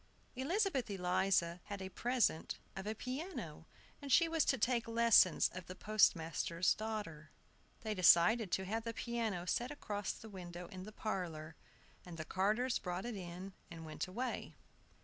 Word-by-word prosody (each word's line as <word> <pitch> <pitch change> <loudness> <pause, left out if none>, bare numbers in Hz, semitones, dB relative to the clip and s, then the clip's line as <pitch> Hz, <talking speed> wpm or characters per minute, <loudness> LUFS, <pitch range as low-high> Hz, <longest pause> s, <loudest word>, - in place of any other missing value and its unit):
ELIZABETH 280 - 0
ELIZA 180 -2 +1
had 200 -1 -5
a 190 - -5
present 240 -6 0 0.2
of 190 +1 -5
a 215 - -2
piano, 250 - -5 0.3
and 280 -1 -5
she 335 +5 +6
was 325 -1 +2
to 270 - +2
take 235 0 +1
lessons 230 -6 +5
of 185 -1 -7
the 185 - -7
postmaster's 170 -5 +2
daughter. 205 -9 -5 0.5
They 220 -1 -2
decided 185 +3 +5
to 190 - +1
have 220 +4 -2
the 230 -1 -4
piano 225 -7 -2
set 240 +7 0
across 205 -9 -3
the 220 - -11
window 180 -3 -8
in 185 0 -8
the 215 - -8
parlor, 170 -8 -4 0.5
and 175 -2 -9
the 155 - -5
carters 215 +8 +1
brought 180 +2 -4
it 240 -2 -4
in, 185 +1 -7 0.2
and 165 -1 -9
went 155 +4 -4
away. 240 +8 -4
200 Hz, 160 wpm, -36 LUFS, 180-235 Hz, 0.5 s, she